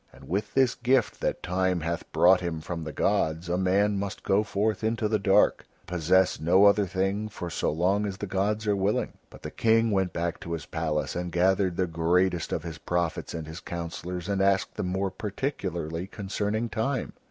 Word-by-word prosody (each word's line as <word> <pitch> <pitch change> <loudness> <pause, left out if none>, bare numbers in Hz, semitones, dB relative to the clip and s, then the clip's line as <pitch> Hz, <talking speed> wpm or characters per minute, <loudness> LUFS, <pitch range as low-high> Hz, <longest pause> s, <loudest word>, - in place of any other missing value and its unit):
And - - -15
with 100 +4 -2
this 130 -3 +4
gift 125 -1 +1
that - - -1
Time 90 -1 0
hath 85 +1 -4
brought 90 +1 +5
him 85 -3 -3
from 85 +1 -5
the 80 - -4
gods 80 +3 0
a 90 - +1
man 100 +2 +2
must 100 -1 -5
go 95 +2 +3
forth 105 +1 -1
into 110 0 0
the 110 0 +1
dark 95 0 +4
to - - -29 0.3
possess 90 +2 +3
no 90 +5 +5
other 100 0 +5
thing 95 +3 -1
for 90 -4 -6
so - - 0
long 95 +6 +1
as 95 -1 -5
the 105 - -4
gods 100 +3 -1
are 105 -1 +2
willing." 100 +2 0 0.2
But - - -15
the - - -5
King 115 0 +3
went 95 -3 +1
back 85 0 -2
to 85 - -6
his 80 -3 -4
palace 80 -2 -2
and 90 0 -3
gathered 95 0 +2
the 95 - +2
greatest 85 +1 +1
of 80 - -2
his 85 -2 -7
prophets 85 -1 -2
and 80 -1 -5
his 80 +2 -8
councillors 85 +1 -5
and 100 -1 0
asked 100 0 +2
them - - -3
more 95 +1 -1
particularly 95 - -3
concerning 105 +3 -2
Time. 125 +4 -2
95 Hz, 200 wpm, -27 LUFS, 85-105 Hz, 0.3 s, brought